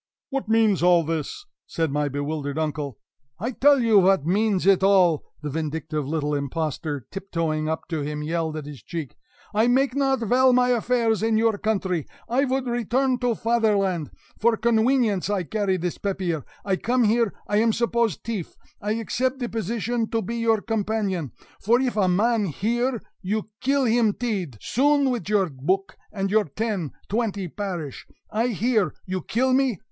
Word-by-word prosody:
"What 270 -5 -3
means 220 -5 +3
all 175 -1 +5
this?" 160 - -4 0.2
said 160 -3 -1
my 145 0 0
bewildered 145 +1 -3
uncle. 150 -5 -2 0.4
"I 230 +6 -3
tell 280 +2 +4
you 220 -4 +5
vat 190 -5 +3
means 195 +1 +1
it 195 -1 +5
all!" 185 -5 +4 0.2
the 150 - -2
vindictive 155 -1 -3
little 150 -1 -1
impostor, 145 -1 -3
tiptoeing 165 -5 -2
up 160 - -3
to 160 -3 -2
him, 150 +1 -3
yelled 160 0 -2
at 150 - -6
his 145 -5 -9
cheek. 160 +3 -6 0.4
"I 220 +3 +3
make 260 +1 +3
not 270 -2 +1
vell 250 +3 +4
my 250 0 +4
affairs 235 -2 +1
in 225 0 +2
your 225 -1 +3
country; 190 -7 -1 0.2
I 260 +4 +2
vould 265 0 -1
return 245 +2 0
to 245 -2 +1
Faderlant; 205 -9 +1 0.3
for 230 0 +3
conwenience 225 -4 +2
I 200 -3 0
carry 200 +1 0
dis 175 0 -3
pappeer. 185 -7 -2 0.2
I 190 -2 +1
come 245 +4 +1
here; 225 -1 +2 0.2
I 205 - +1
am 225 +1 +4
suppose 235 -4 +1
teaf; 215 -7 -5 0.3
I 210 +1 -1
accept 255 +4 -1
de 245 -3 -3
position 225 +2 -2
to 225 -1 -1
be 235 +5 -4
your 225 -2 +2
companion, 205 - -1 0.3
for 235 +4 +3
if 255 -3 0
a 200 -3 +2
man 215 +4 +2
hear, 235 - -1 0.2
you 210 +3 -2
kill 275 +1 +2
him 225 -2 +3
tead 195 - -3
soon 280 +1 +2
vid 215 -6 -4
your 195 -5 +2
book 180 +9 -1 0.2
and 195 -2 -2
your 215 0 +3
ten, 195 -2 -3 0.2
twenty 205 -3 -1
parish! 175 -6 -5 0.2
I 225 +3 +1
hear! 225 -2 +1
You 185 0 -3
kill 255 +9 +1
me! 260 -6 +2
210 Hz, 170 wpm, -24 LUFS, 165-235 Hz, 0.4 s, all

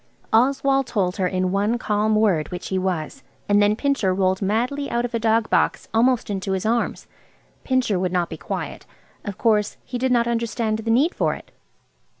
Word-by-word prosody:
Oswald 270 +3 +3
told 195 -5 -1
her 185 -2 +1
in 185 0 -1
one 205 +4 +1
calm 215 -1 0
word 190 -8 +2
which 180 0 -6
he 190 - 0
was, 185 - -3 0.3
and 205 0 +4
then 205 +1 +3
Pincher 235 -8 0
rolled 190 0 +1
madly 245 +8 -1
out 240 +1 0
of 245 - -6
a 230 - 0
dog 225 0 +2
box - - +1
almost 235 -1 +2
into 195 -1 -2
his 190 +1 -2
arms. 230 +2 0 0.6
Pincher 255 -7 +1
would 180 -1 -1
not 175 -2 0
be 160 - -7
quiet. 140 -3 -6 0.4
Of 200 -2 -6
course 210 -3 +1
he 245 - -4
did 260 +1 0
not 235 -1 +3
understand 230 -2 -1
the 225 +1 -4
need 275 +10 +3
for - - 0
it. - - -14
215 Hz, 190 wpm, -22 LUFS, 190-240 Hz, 0.6 s, and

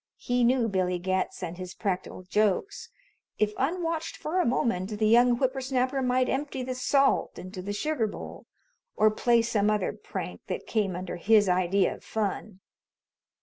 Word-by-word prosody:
He 245 0 0
knew 240 -1 +3
Billy 185 -3 0
Getz 185 +1 -2
and 175 +1 -5
his 185 0 -7
practical 185 -2 -3
jokes. 215 - 0 0.5
If 210 0 +1
unwatched 330 +2 -2
for 345 +4 -2
a 360 - +2
moment, 215 -4 0
the 215 - +1
young 240 +2 +5
whipper 260 +1 0
snapper 260 +1 0
might 255 0 +2
empty 270 -1 -2
the 255 0 -3
salt 275 +2 +2
into 185 +1 -7
the 200 +2 -5
sugar 245 +2 0
bowl, - - -9 0.5
or 215 0 +4
play 235 +2 +3
some 215 -3 +1
other 210 -1 0
prank - - -6
that - - -4
came 205 -5 0
under 180 0 -5
his 210 +3 +4
idea 185 +1 +2
of - - -14
fun. 205 -2 -3
220 Hz, 165 wpm, -27 LUFS, 190-255 Hz, 0.5 s, young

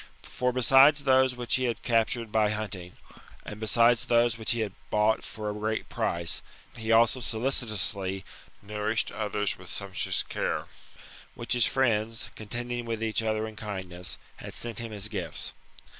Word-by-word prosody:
For, 125 +1 -1
besides 135 +4 +6
those 130 -1 +4
which 120 -1 0
he 130 - 0
had 120 -2 -2
captured 115 -1 +1
by 110 -1 +3
hunting, 100 -4 -4 0.5
and 105 - -7
besides 115 +2 +4
those 120 -1 +3
which 110 -1 -5
he 120 - -1
had 105 -3 -2 0.2
bought 105 +1 +2
for 105 -1 -6
a 105 - -1
great 110 +1 -2
price, 85 -1 -1 0.3
he 110 -1 -3
also 115 +3 +5
solicitously 110 -6 0 0.4
nourished 105 +2 -1
others 105 -1 -2
with - - -11
sumptuous - - -2
care, - - -2 0.7
which 115 - -1
his 120 -3 +4
friends, 115 -2 0
contending 120 +2 -4
with 115 -1 -3
each 110 0 +1
other 110 -1 0
in 110 - -9
kindness, 95 -5 -6 0.2
had - - -9
sent 115 -3 -3
him 115 -1 -5
as 105 0 -2
gifts. 90 -8 -4
110 Hz, 160 wpm, -28 LUFS, 105-120 Hz, 0.7 s, besides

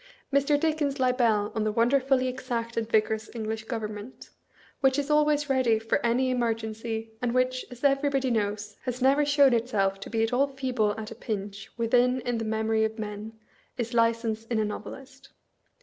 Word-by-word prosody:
Mr. 280 +1 +3
Dickens' 295 -3 0
libel 235 -5 +2
on 220 - -1
the 215 - 0
wonderfully 255 +3 +2
exact 245 -2 -3
and 230 -1 -2
vigorous 220 0 +1
English 220 -1 -4
government, 220 0 -6 0.5
which 270 0 +3
is 285 +1 -1
always 300 -1 +3
ready 260 -5 +3
for 225 0 -1
any 250 +2 +2
emer 240 -3 +1
gency, 225 0 -5
and 245 0 -1
which, 255 0 +1
as 245 0 -12
everybody 275 -2 +2
knows, 210 -1 -2
has 250 -1 -3
never 270 +3 +4
shown 285 -2 +5
itself 205 -5 0
to 195 - -8
be 225 -1 0
at 225 +2 -1
all 275 +3 +3
feeble 250 -6 -1
at 220 0 -7
a - - -7
pinch 200 -3 -5
within 245 +2 +3
in 240 -2 -2
the - - -2
memory 220 0 +1
of 220 +1 -1
men, 210 0 -6 0.4
is 235 -1 -3
License 230 -1 +1
in 230 0 -2
a 215 - +1
novelist. 265 +5 -8
235 Hz, 180 wpm, -27 LUFS, 220-265 Hz, 0.5 s, shown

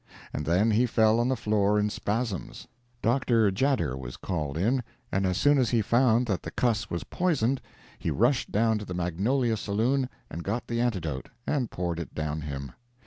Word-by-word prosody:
And 75 - -3
then 95 +7 +3
he 120 +4 +3
fell 110 0 +3
on 120 - +2
the 130 - +1
floor 105 -3 +2
in 105 0 +1
spasms. 105 -3 -3 0.4
Dr. 115 -3 +3
Tjader 130 - +1
was 65 -2 -7
called 75 -6 -3
in, 120 +9 +2 0.3
and 95 0 +1
as 90 -1 0
soon 145 +5 +4
as 125 - +2
he 115 -3 +2
found 120 +1 +3
that 100 -6 -1
the - - -6
cuss 115 -4 0
was 85 - -3
poisoned, 140 -8 0 0.4
he - - -2
rushed 125 +4 +2
down 110 +1 +2
to 105 - -7
the 90 - -5
Magnolia 110 +8 0
Saloon 120 +6 0 0.2
and 85 +2 -6
got 110 +7 -2
the 120 0 -1
antidote, 85 - -2 0.2
and 135 -6 0
poured 85 -2 -3
it 85 - -7
down 75 0 -2
him. 70 -3 -5
110 Hz, 190 wpm, -28 LUFS, 90-120 Hz, 0.4 s, soon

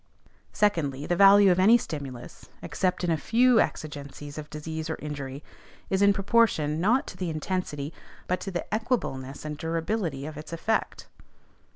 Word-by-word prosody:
Secondly, 150 -9 0
the 175 - 0
value 200 +1 +7
of 180 - +2
any 215 +6 +7
stimulus 140 - -8
(except 185 -1 -1
in 175 - +1
a 160 - +2
few 235 +8 +4
exigencies 145 -2 -4
of 150 - -9
disease 160 +1 -5
or 160 - -1
injury) 140 -2 -6 0.5
is 190 0 +1
in 200 0 +6
proportion, 195 -7 +2
not 235 +8 +3
to - - -9
the 180 -2 -3
intensity, 155 -2 -3 0.3
but 180 0 -1
to 195 - -5
the 175 -2 -3
equableness 155 - -2
and 150 -1 -5
durability, 165 -3 -2
of 155 -1 -7
its 155 - -9
effect. 215 +7 -2
165 Hz, 160 wpm, -27 LUFS, 150-200 Hz, 0.5 s, value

